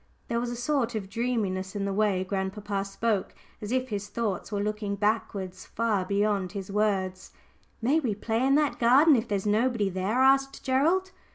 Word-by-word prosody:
There 235 0 0
was 240 0 -2
a 240 - -4
sort 245 -1 0
of 195 -3 -4
dreaminess 210 -6 -2
in 200 -1 -1
the 200 - -1
way 200 -2 +1
grandpapa 195 +1 -3
spoke, 200 0 -1 0.3
as 210 +1 -5
if 255 0 0
his 205 -1 -3
thoughts 205 -2 -3
were 205 - -1
looking 210 0 -2
back 215 +2 0
somehow 190 -2 -4
far 205 +1 -2
beyond 200 -1 0
his 195 -1 -6
words. 195 -3 0 0.5
"May 280 +7 +3
we 240 -9 -1
play 225 +3 -1
in 270 +1 +4
that 300 -1 +1
garden 270 +6 +6
if 230 -1 0
there's 200 -2 -2
nobody 215 0 +2
there?" 195 +7 0
asked 270 0 +3
Gerald. 330 +9 +2
215 Hz, 185 wpm, -27 LUFS, 195-245 Hz, 0.5 s, garden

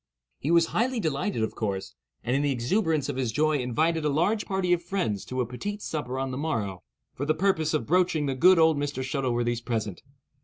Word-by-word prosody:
He 145 - -3
was 170 0 +5
highly 245 +1 +1
delighted, 155 - -1
of 110 - -2
course, 100 -3 -3 0.3
and 125 +3 0
in 140 - +2
the 145 -1 +1
exuberance 150 - 0
of 145 -3 -3
his 125 -4 0
joy 155 +2 +2
invited 155 +6 0
a 150 - +2
large 175 +9 +1
party 190 -2 +1
of 175 - +1
friends 175 - -2
to 130 0 -2
a - - 0
petit 200 - -5
souper 145 - -4
on 135 0 -2
the 130 - -4
morrow, 105 - -2 0.3
for 140 - -5
the 155 - +2
purpose 160 -3 +1
of 155 - -1
broaching 175 -2 +2
the 135 - 0
good 180 +8 +6
old 160 -2 +5
Mr. 145 -2 -2
Shuttleworthy's 120 -3 -1
present. 110 -5 -3
145 Hz, 215 wpm, -27 LUFS, 125-170 Hz, 0.3 s, good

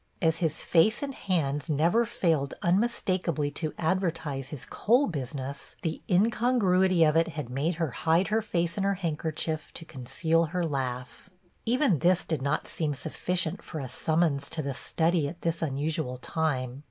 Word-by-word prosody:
As 160 -1 +2
his 160 -3 -1
face 195 - +3
and 275 -1 -3
hands 150 - -1
never 170 +10 +3
failed 160 -10 0
unmistakably 185 - +1
to 155 +1 -3
advertise 160 -6 -1
his 145 -5 -6
coal 245 +6 +3
business, 140 - -5
the 160 -1 -2
incongruity 190 -3 +3
of 155 -1 +4
it 165 0 +4
had 150 -6 -5
made 150 +7 0
her 160 -4 -1
hide 165 - +2
her 220 +1 +2
face 170 -4 -1
in - - +1
her 200 0 +2
handkerchief 160 -2 -3
to 165 - -8
conceal 160 +5 0
her 175 +2 -1
laugh. 130 -4 -4 0.4
Even 245 - +3
this 180 +1 +3
did 160 -5 -2
not 140 +3 0
seem 150 -3 -2
sufficient 175 +5 -2
for 155 - -6
a 135 - -4
summons 150 +1 0
to 155 - -3
the 140 0 -2
study 160 +3 0
at 170 +4 -8
this 165 0 -1
unusual 150 -2 -1
time. 130 -3 -2
160 Hz, 165 wpm, -28 LUFS, 145-180 Hz, 0.4 s, of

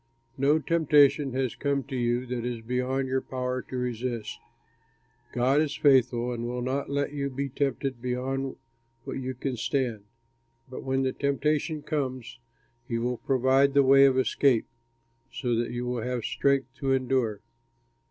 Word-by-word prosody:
No 140 +3 +3
temptation 150 -3 +3
has 130 -2 -1
come 140 -1 -1
to 135 +2 -7
you 120 0 0
that 125 -1 -4
is 120 -1 -3
beyond 125 +3 -1
your 130 0 0
power 130 0 -3
to 130 - -7
resist. 120 -2 -3 0.9
God 130 +4 +2
is 150 -1 -1
faithful 125 -3 +3
and 120 0 -4
will 125 0 -3
not 135 +3 -2
let 140 +1 -1
you 140 -1 -2
be 140 +1 -3
tempted 135 -2 -2
beyond 130 +2 -2 0.5
what - - -5
you 130 0 -4
can 130 0 -3
stand; 115 -4 -1 0.7
but - - -6
when 135 0 0
the 130 -1 0
temptation 150 +2 0
comes, 130 -5 -3 0.5
he 115 - -1
will 120 +1 -1
provide 135 +2 +2
the 140 - +6
way 135 +1 +7
of 130 -1 +3
escape, 130 -2 +3 0.7
so 125 -3 -2
that 115 +1 0
you 120 0 -4
will 125 -1 -2
have 125 0 -3
strength 135 -1 +1
to 135 -2 +1
endure. 130 -5 0
130 Hz, 160 wpm, -27 LUFS, 125-140 Hz, 0.9 s, way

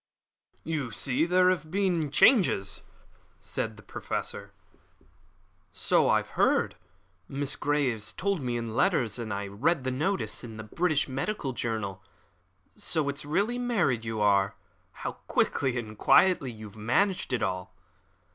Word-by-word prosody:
"You 155 -6 -2
see 135 +7 +1
there 180 +1 +4
have 165 -4 -3
been 180 -5 0
changes," 150 - +4 0.6
said - - -4
the - - -14
Professor. 100 0 -5 1.2
"So - - +2
I - - +3
heard. - - +1 0.5
Miss 140 0 0
Grey 145 -5 +1 0.2
told 195 -3 0
me 120 -2 -2
in 115 -1 -4
her - - -6
letters, 125 - +1
and 115 -2 -4
I 100 0 -2
read 130 - 0
the 130 - -1
notice 160 +8 -1
in 115 -2 -8
the 110 - -6
British 155 +6 0
Medical 135 +2 -3
Journal. 110 -6 -3 0.7
So 150 -3 0
it's 140 +1 -3
really 205 +11 0
married 195 - +1
you 110 -1 -3
are. 100 -1 +3 0.5
How - - 0 0.2
quickly 130 -3 +1
and 110 -2 -5
quietly 175 - +4
you 110 -1 -10
have 100 - -18
managed 135 - +1
it 125 -4 0
all!" 95 -2 -3
135 Hz, 145 wpm, -28 LUFS, 110-170 Hz, 1.2 s, there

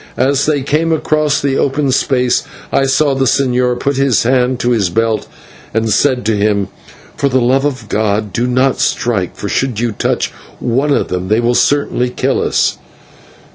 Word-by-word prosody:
As 140 +2 +1
they 150 -2 +1
came 155 +4 0
across 155 -2 +1
the 140 -1 0
open 140 0 0
space 125 -1 +1 0.3
I 135 - +3
saw 140 +1 +2
the 135 0 0
señor 125 -1 +1
put 140 -1 -1
his 135 -4 +2
hand 125 +1 +1
to 120 - +1
his 105 -6 +1
belt, 110 +3 -1 0.5
and 110 -1 0
said 125 +2 +1
to 110 0 +1
him: 100 -1 0 0.5
"For 140 - 0
the 130 0 +2
love 130 +3 +2
of 130 -6 -3
God! 105 -1 -1
do 120 +5 0
not 130 +2 +1
strike, 100 -7 -1
for 100 - -5
should 125 0 -1
you 120 0 0
touch 105 - -1 0.3
one 135 +5 0
of - - +1
them 90 0 -3
they 110 +3 +2
will 120 +1 +1
certainly 135 -2 +1
kill - - -1
us." - - 0
125 Hz, 180 wpm, -14 LUFS, 115-140 Hz, 0.5 s, I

